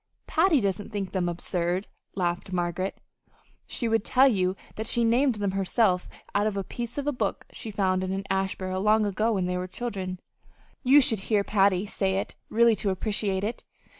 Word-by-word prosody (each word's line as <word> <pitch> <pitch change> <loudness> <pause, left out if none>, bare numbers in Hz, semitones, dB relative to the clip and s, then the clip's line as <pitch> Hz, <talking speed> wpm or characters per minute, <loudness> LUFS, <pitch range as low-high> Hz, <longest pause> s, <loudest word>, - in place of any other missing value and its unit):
"Patty 330 -2 +3
doesn't 200 -2 -2
think 200 -3 -3
them 180 -2 0
absurd," 175 +2 -1 0.3
laughed 175 0 -2
Margaret. 180 +1 -2 0.7
"She 235 - -2
would 225 -2 +2
tell 265 +3 +5
you 185 -6 +1 0.2
that 220 +1 -3
she 235 - +3
named 240 +2 +3
them 205 -2 -1
herself 195 -1 +1 0.2
out 205 +1 +2
of 205 -2 -2
a 195 - -1
'piece 240 +6 -6
of 285 - -2
a 295 - +1
book' 220 -7 -2
she 225 - -6
found 190 -2 0
in 185 - -3
the 195 +1 -2
ash 190 0 -1
barrel 185 0 -3
long 215 +1 +4
ago 215 +3 +1
when 190 -3 0
they 180 0 -1
were 180 - -4
children. 185 -3 -5 0.6
You 280 +3 +6
should 225 -5 +2
hear 210 -3 +3
Patty 195 -2 +2
say 195 -2 -1
it 195 - -3 0.2
really 230 0 +4
to 200 - 0
appreciate 195 0 -1
it. 225 +4 -3
200 Hz, 195 wpm, -27 LUFS, 185-225 Hz, 0.7 s, You